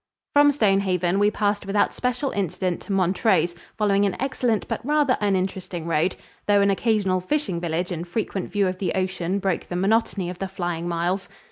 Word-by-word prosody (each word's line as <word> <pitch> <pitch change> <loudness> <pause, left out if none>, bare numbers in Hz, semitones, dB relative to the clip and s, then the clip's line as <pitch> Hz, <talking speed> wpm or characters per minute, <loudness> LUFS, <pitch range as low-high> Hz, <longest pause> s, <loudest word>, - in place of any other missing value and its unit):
From 290 0 +6
Stonehaven 195 -7 +2
we 205 0 +4
passed 205 -1 -1
without 205 +1 +2
special 250 +2 -1
incident 185 -2 -2
to - - -8
Montrose, 185 -2 +2 0.2
following 205 -2 +2
an 190 - -3
excellent 250 -5 0
but - - -3
rather 290 -1 +2
uninteresting 185 -3 -1
road, 170 +2 +1 0.3
though 205 -1 +5
an 200 0 +4
occasional 195 -3 +1
fishing 195 - -1
village 175 +2 -2
and 175 0 -4
frequent 195 0 -3
view 200 -2 +2
of 185 0 -3
the 190 -1 -1
ocean 185 0 -1
broke 195 -3 -1
the 175 - -6
monotony 195 0 +1
of 180 - -10
the 195 - -2
flying 175 -2 -3
miles. 175 +3 -1
195 Hz, 175 wpm, -24 LUFS, 180-210 Hz, 0.3 s, From